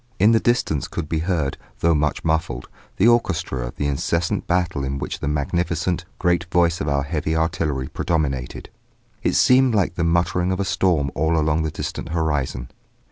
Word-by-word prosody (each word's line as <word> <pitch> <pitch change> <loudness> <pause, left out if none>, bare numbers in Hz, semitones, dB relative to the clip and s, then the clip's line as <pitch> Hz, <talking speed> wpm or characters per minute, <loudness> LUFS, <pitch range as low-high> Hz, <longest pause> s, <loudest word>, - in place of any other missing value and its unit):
In 105 +4 +5
the 115 - +5
distance 120 - 0
could 85 -3 -4
be 80 0 -1
heard, 80 -5 -1 0.2
though 85 0 +4
much 75 -1 0
muffled, 80 -6 -1 0.3
the 105 - +4
orchestra 80 - +1
of - - -9
the 75 - -2
incessant 80 +4 -1
battle 85 -5 0
in 70 +1 -2
which - - -4
the - - -3
magnificent, 85 +4 -1
great 90 -1 +1
voice 85 -1 +2
of - - -2
our 70 -1 +1
heavy 75 +2 -2
artillery 80 -5 -1
predominated; 70 -7 -2 0.5
it - - 0
seemed 125 -2 +5
like 95 -3 +1
the 85 - -2
muttering 85 +2 +1
of 95 - -1
a 100 - 0
storm 85 -8 +1
all 80 +2 +1
along 80 0 +1
the 80 - -1
distant 80 - -5
horizon. 75 -7 -1
80 Hz, 180 wpm, -22 LUFS, 75-90 Hz, 0.5 s, In